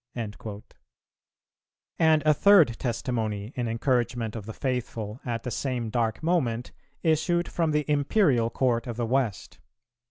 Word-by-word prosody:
"[307:2] 105 Hz, -2 st, -6 dB, 1.4 s
And 160 Hz, -2 st, +4 dB
a 155 Hz, -, +6 dB
third 165 Hz, -, +5 dB
testimony 115 Hz, -3 st, -2 dB
in 120 Hz, -2 st, -2 dB
encouragement 120 Hz, -1 st, 0 dB
of 110 Hz, -2 st, -7 dB
the -, -, -4 dB
faithful 115 Hz, -4 st, -3 dB
at 115 Hz, -2 st, -3 dB
the 125 Hz, -, -4 dB
same 120 Hz, -3 st, -2 dB
dark 115 Hz, +2 st, -1 dB
moment 130 Hz, -9 st, 0 dB, 0.3 s
issued 170 Hz, +2 st, +2 dB
from 165 Hz, -2 st, 0 dB
the 150 Hz, -1 st, +1 dB
Imperial 145 Hz, -, +2 dB
court 120 Hz, -1 st, 0 dB
of 120 Hz, -2 st, -5 dB
the 120 Hz, -, 0 dB
West. 120 Hz, -4 st, -1 dB
125 Hz, 135 wpm, -27 LUFS, 115-150 Hz, 1.4 s, a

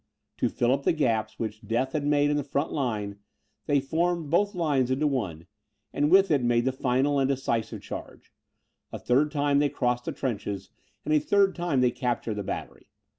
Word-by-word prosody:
To -, -, +1 dB
fill 120 Hz, +1 st, +1 dB
up 135 Hz, +1 st, +1 dB
the -, -, +2 dB
gaps 110 Hz, -8 st, 0 dB
which 110 Hz, -2 st, -4 dB
death 120 Hz, +5 st, -1 dB
had 150 Hz, -, -1 dB
made 145 Hz, 0 st, +3 dB
in -, -, +1 dB
the 145 Hz, -, 0 dB
front 140 Hz, +2 st, -2 dB
line, 105 Hz, -7 st, -2 dB, 0.5 s
they 145 Hz, -, +3 dB
formed 165 Hz, +2 st, -1 dB
both 200 Hz, +4 st, +2 dB
lines 145 Hz, -7 st, +1 dB
into 135 Hz, +4 st, +1 dB
one, 100 Hz, -, -2 dB, 0.5 s
and 145 Hz, +1 st, +1 dB
with 195 Hz, +1 st, +5 dB
it 145 Hz, -3 st, +3 dB
made 120 Hz, 0 st, +2 dB
the 130 Hz, -, +2 dB
final 130 Hz, +2 st, +1 dB
and 135 Hz, 0 st, +2 dB
decisive 125 Hz, -5 st, -2 dB
charge. -, -, -9 dB, 0.6 s
A -, -, -5 dB
third 135 Hz, +5 st, +2 dB
time 145 Hz, -1 st, +1 dB
they 145 Hz, 0 st, +2 dB
crossed 125 Hz, -2 st, -1 dB
the -, -, -2 dB
trenches, 100 Hz, -6 st, -4 dB, 0.3 s
and 155 Hz, -, +1 dB
a 155 Hz, -, +5 dB
third 195 Hz, +5 st, +3 dB
time 170 Hz, -7 st, 0 dB
they 125 Hz, -1 st, +3 dB
captured 120 Hz, -3 st, -2 dB
the 105 Hz, -, -3 dB
battery. -, -, -6 dB
135 Hz, 195 wpm, -27 LUFS, 120-150 Hz, 0.6 s, with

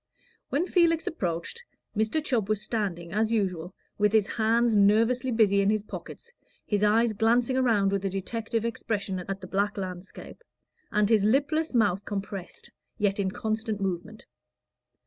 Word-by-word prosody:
When 300 Hz, +6 st, +1 dB
Felix 335 Hz, -3 st, +2 dB
approached, 175 Hz, -, -3 dB, 0.3 s
Mr. 220 Hz, +9 st, 0 dB
Chubb 225 Hz, -6 st, 0 dB
was 215 Hz, -2 st, +1 dB
standing, 190 Hz, -7 st, -3 dB
as 220 Hz, +2 st, +1 dB
usual, 185 Hz, -5 st, -1 dB, 0.2 s
with 210 Hz, 0 st, +3 dB
his 215 Hz, -2 st, +4 dB
hands 230 Hz, +1 st, +2 dB
nervously 225 Hz, +6 st, +3 dB
busy 210 Hz, -4 st, +3 dB
in 200 Hz, -, +2 dB
his 215 Hz, -1 st, +1 dB
pockets, 470 Hz, -, -9 dB, 0.3 s
his 205 Hz, -1 st, 0 dB
eyes 220 Hz, +2 st, +3 dB
glancing 235 Hz, +4 st, +2 dB
around 225 Hz, -7 st, +2 dB
with 200 Hz, -1 st, -1 dB
a 195 Hz, -, 0 dB
detective 225 Hz, +4 st, -3 dB
expression 205 Hz, -4 st, -2 dB
at 195 Hz, +2 st, -5 dB
the -, -, -7 dB
black 200 Hz, +2 st, -1 dB
landscape, 185 Hz, -, -8 dB, 0.5 s
and 210 Hz, 0 st, +2 dB
his 215 Hz, -2 st, +3 dB
lipless 285 Hz, +7 st, +1 dB
mouth 205 Hz, -4 st, +2 dB
compressed, 195 Hz, -2 st, -6 dB, 0.3 s
yet 205 Hz, -2 st, 0 dB
in 195 Hz, -1 st, +1 dB
constant 220 Hz, +1 st, -3 dB
movement. 195 Hz, +3 st, -4 dB
210 Hz, 150 wpm, -27 LUFS, 195-230 Hz, 0.5 s, his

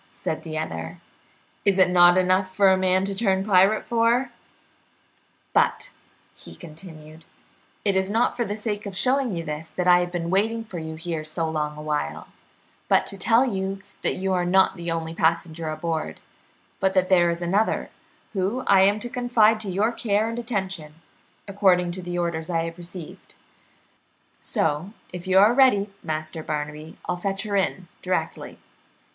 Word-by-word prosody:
said 160 Hz, -, -4 dB
the 155 Hz, -1 st, -6 dB
other. 80 Hz, -, -5 dB, 0.6 s
"Is 200 Hz, -2 st, +2 dB
it 185 Hz, -1 st, +4 dB
not 175 Hz, 0 st, +6 dB
enough 185 Hz, +1 st, +2 dB
for 195 Hz, -1 st, +5 dB
a -, -, +5 dB
man 185 Hz, 0 st, +2 dB
to 200 Hz, -, -2 dB
turn 195 Hz, -2 st, +1 dB
pirate 195 Hz, +1 st, +3 dB
for? 235 Hz, +2 st, +2 dB, 1.2 s
But," -, -, +1 dB, 0.4 s
he -, -, -13 dB
continued, 155 Hz, -2 st, -12 dB, 0.6 s
"it 200 Hz, -2 st, +2 dB
is 190 Hz, 0 st, +1 dB
not 225 Hz, +3 st, +1 dB
for 240 Hz, -, 0 dB
the 205 Hz, -2 st, -3 dB
sake 210 Hz, -1 st, -4 dB
of 195 Hz, -2 st, -5 dB
showing 250 Hz, -2 st, +1 dB
you 165 Hz, -, -3 dB
this 155 Hz, 0 st, -5 dB
that 180 Hz, +2 st, -3 dB
I 180 Hz, 0 st, +7 dB
have 175 Hz, 0 st, -2 dB
been 170 Hz, -1 st, -3 dB
waiting 225 Hz, +4 st, +1 dB
for 190 Hz, -6 st, -7 dB
you 160 Hz, 0 st, -6 dB
here 160 Hz, -1 st, -4 dB
so 160 Hz, +1 st, -2 dB
long 150 Hz, -1 st, -3 dB
a 150 Hz, -, -8 dB
while, 150 Hz, -, -3 dB, 0.6 s
but -, -, +3 dB
to 195 Hz, -, -5 dB
tell 230 Hz, +7 st, +4 dB
you 195 Hz, -4 st, -3 dB, 0.2 s
that -, -, 0 dB
you 190 Hz, 0 st, -1 dB
are 180 Hz, -1 st, +1 dB
not 190 Hz, +2 st, +3 dB
the 170 Hz, -2 st, -5 dB
only 165 Hz, -1 st, -3 dB
passenger 165 Hz, 0 st, 0 dB
aboard, 160 Hz, 0 st, -3 dB, 0.6 s
but 190 Hz, 0 st, +1 dB
that 185 Hz, -1 st, +3 dB
there 175 Hz, -2 st, +4 dB
is 170 Hz, 0 st, -2 dB
another, 195 Hz, +6 st, 0 dB, 0.4 s
whom 205 Hz, +6 st, -1 dB
I 190 Hz, -, +5 dB
am 200 Hz, +2 st, +4 dB
to 240 Hz, -, -3 dB
confide 235 Hz, -3 st, +2 dB
to 210 Hz, -2 st, -4 dB
your 205 Hz, +5 st, +1 dB
care 220 Hz, -2 st, 0 dB
and 230 Hz, +1 st, -4 dB
attention, 190 Hz, -10 st, -4 dB, 0.5 s
according 190 Hz, -3 st, +2 dB
to 175 Hz, -1 st, -5 dB
orders 170 Hz, -1 st, -2 dB
I 165 Hz, -2 st, 0 dB
have 165 Hz, +1 st, -6 dB
received; 175 Hz, -2 st, -10 dB, 1.1 s
so, 160 Hz, +6 st, -1 dB, 0.2 s
if 180 Hz, +1 st, -7 dB
you 190 Hz, 0 st, +3 dB
are 205 Hz, +4 st, +6 dB
ready, 240 Hz, -7 st, +4 dB
Master 155 Hz, 0 st, -4 dB
Barnaby, 150 Hz, +1 st, -5 dB
I'll 180 Hz, -, -2 dB
fetch 195 Hz, +2 st, -2 dB
her 205 Hz, -2 st, -3 dB
in 190 Hz, -2 st, -1 dB
directly." 185 Hz, 0 st, -3 dB
185 Hz, 175 wpm, -24 LUFS, 165-200 Hz, 1.2 s, I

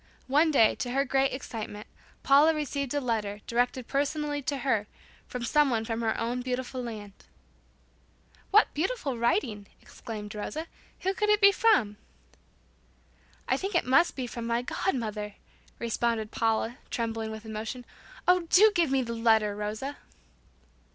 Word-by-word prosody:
One 300 Hz, +5 st, +3 dB
day, 230 Hz, -8 st, +5 dB
to 245 Hz, -, -3 dB
her 275 Hz, +1 st, +2 dB
great 270 Hz, 0 st, +2 dB
excitement, 215 Hz, -5 st, -6 dB, 0.4 s
Paula 295 Hz, +4 st, +5 dB
received 280 Hz, -3 st, -3 dB
a -, -, +2 dB
letter, 215 Hz, -5 st, -2 dB
directed 245 Hz, +1 st, 0 dB
personally 290 Hz, +1 st, -1 dB
to 275 Hz, +1 st, -2 dB
her, 235 Hz, -6 st, 0 dB, 0.4 s
from 250 Hz, -1 st, -5 dB
someone 250 Hz, -5 st, +2 dB
from 225 Hz, 0 st, -3 dB
her 220 Hz, -1 st, 0 dB
own 240 Hz, +2 st, -1 dB
beloved 255 Hz, +1 st, -3 dB
land. 225 Hz, -6 st, -6 dB, 1.4 s
"What -, -, +5 dB
beautiful 305 Hz, -, -2 dB
writing!" 235 Hz, -, 0 dB
exclaimed 210 Hz, -4 st, -8 dB
Rosa. 300 Hz, +10 st, -4 dB, 0.4 s
"Who 380 Hz, +1 st, 0 dB
could 420 Hz, +2 st, 0 dB
it 420 Hz, 0 st, +5 dB
be 400 Hz, -1 st, +8 dB
from?" 395 Hz, -, +3 dB, 1.5 s
"I -, -, +2 dB
think 390 Hz, 0 st, -4 dB
it 345 Hz, -, +2 dB
must 300 Hz, +8 st, +4 dB
be 260 Hz, -, -3 dB
from 235 Hz, -1 st, -6 dB
my 235 Hz, +1 st, 0 dB
god 380 Hz, +7 st, -1 dB
mother," 210 Hz, -3 st, -4 dB, 0.4 s
responded 230 Hz, -1 st, -1 dB
Paula, 225 Hz, +3 st, 0 dB
trembling 225 Hz, -1 st, -2 dB
with 220 Hz, 0 st, -8 dB
emotion. 220 Hz, +3 st, -5 dB, 0.4 s
"Oh, 360 Hz, -1 st, +4 dB
do 425 Hz, +4 st, +7 dB
give 340 Hz, -5 st, +2 dB
me 265 Hz, -1 st, +2 dB
the 235 Hz, -1 st, -4 dB
letter, 220 Hz, -3 st, +3 dB
Rosa." 215 Hz, +7 st, -4 dB
245 Hz, 150 wpm, -28 LUFS, 220-290 Hz, 1.5 s, be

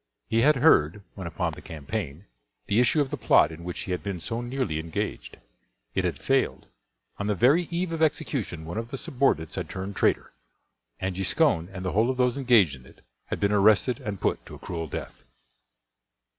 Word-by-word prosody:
He 115 Hz, 0 st, +3 dB
had 150 Hz, +4 st, +5 dB
heard, 105 Hz, -, +4 dB
when 95 Hz, -3 st, -6 dB
upon 85 Hz, -, -2 dB
the -, -, -10 dB
campaign, 75 Hz, +2 st, -5 dB, 0.4 s
the 105 Hz, +3 st, +2 dB
issue 125 Hz, +5 st, +4 dB
of 135 Hz, -, -2 dB
the -, -, -2 dB
plot 75 Hz, -, +4 dB
in 80 Hz, +1 st, -10 dB
which 90 Hz, 0 st, -5 dB
he 95 Hz, -, -5 dB
had 90 Hz, -, -1 dB
been 100 Hz, -3 st, -4 dB
so 115 Hz, +8 st, -4 dB
nearly 120 Hz, -, -2 dB
engaged. 80 Hz, 0 st, -4 dB, 0.6 s
It -, -, 0 dB
had -, -, -1 dB
failed. -, -, 0 dB, 0.5 s
On 100 Hz, -, -2 dB
the 105 Hz, -, +1 dB
very 145 Hz, -, +4 dB
eve 175 Hz, 0 st, -2 dB
of 165 Hz, -1 st, -3 dB
execution 135 Hz, -, -1 dB
one 85 Hz, +7 st, -4 dB
of 115 Hz, 0 st, -6 dB
the 135 Hz, -, -5 dB
subordinates 125 Hz, -, 0 dB
had -, -, -4 dB
turned 95 Hz, +2 st, -5 dB
traitor, -, -, +1 dB, 0.7 s
and 95 Hz, -1 st, -2 dB
Giscon 95 Hz, -, +2 dB
and 95 Hz, -1 st, -6 dB
the 90 Hz, -, -1 dB
whole 110 Hz, +4 st, +2 dB
of 130 Hz, -, -1 dB
those 125 Hz, -1 st, +2 dB
engaged 120 Hz, -, +4 dB
in 65 Hz, -1 st, -16 dB
it -, -, -19 dB, 0.3 s
had -, -, -3 dB
been 100 Hz, 0 st, +2 dB
arrested 105 Hz, +4 st, +4 dB
and 100 Hz, -2 st, -5 dB
put -, -, -1 dB
to -, -, -9 dB
a -, -, -10 dB
cruel 85 Hz, -2 st, -5 dB
death. -, -, -7 dB
105 Hz, 200 wpm, -26 LUFS, 85-125 Hz, 0.7 s, had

